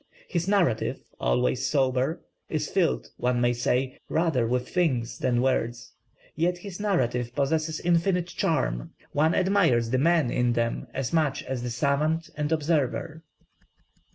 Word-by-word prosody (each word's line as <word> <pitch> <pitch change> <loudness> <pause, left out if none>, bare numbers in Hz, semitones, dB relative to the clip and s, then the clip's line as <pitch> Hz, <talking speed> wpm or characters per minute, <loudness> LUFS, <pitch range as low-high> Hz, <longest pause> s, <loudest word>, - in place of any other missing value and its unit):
His 170 0 -2
narrative, 185 - +1 0.2
always 125 - +1
sober, 135 +2 +1 0.3
is 150 -1 -1
filled 185 -4 0
one 125 0 +1
may 120 0 +3
say 125 +2 -1
rather 155 -8 +1
with 125 +1 -1
things 125 -10 0
than 120 -1 +1
words; 120 -3 -1 0.4
yet 175 +3 +1
his 185 +1 -8
narratives 125 - 0
possess 155 +4 -1
infinite 175 +1 +2
charm; 130 - -1 0.2
one 155 +3 +2
admires 165 - +2
the 130 - +2
man 160 -3 +3
in 125 -1 +1
them 115 0 -1
as 130 0 -3
much 155 -4 +1
as 130 -2 -4
the 120 - -3
savant 150 +6 0
and 150 0 -2
observer." 155 0 0
140 Hz, 140 wpm, -26 LUFS, 125-165 Hz, 0.4 s, may